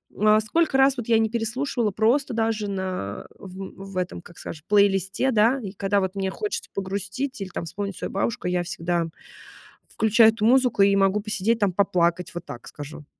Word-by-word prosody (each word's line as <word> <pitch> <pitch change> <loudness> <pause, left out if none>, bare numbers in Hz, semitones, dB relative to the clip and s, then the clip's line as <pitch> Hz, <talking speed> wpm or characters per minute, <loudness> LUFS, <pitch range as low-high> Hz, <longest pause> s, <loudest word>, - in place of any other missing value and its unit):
э, 215 +1 +4
сколько 320 +3 +1
раз 270 0 +5
вот 240 - -5
я 225 -1 +4
не 220 0 +1
переслушивала 235 0 -1
просто 235 +7 +1
даже 225 -2 -1
на 185 - -4
в 195 +1 -9
в - - -6
этом, 180 -1 -3
как 175 -1 -16
скажем, 155 -2 -8
плейлисте, 200 +3 +3
да, 230 +4 +3
и 200 -4 -6
когда 200 0 0
вот 190 0 -2
мне 195 -1 -1
хочется 425 - -4
погрустить 200 +7 -4
или 195 - -4
там 175 - -5
вспомнить 200 +3 -5
свою - - -5
бабушку, 200 -1 -2
я 180 0 0
всегда 170 -1 -2 0.8
включаю 220 +1 +4
эту 220 -1 -2
музыку 250 -3 +4
и 200 0 +5
могу 195 +1 +2
посидеть 215 +2 0
там, 205 -3 +2
поплакать. 180 -2 +1
Вот 175 0 -6
так 120 - -9
скажу. 145 +1 -9
200 Hz, 185 wpm, -24 LUFS, 185-225 Hz, 0.8 s, раз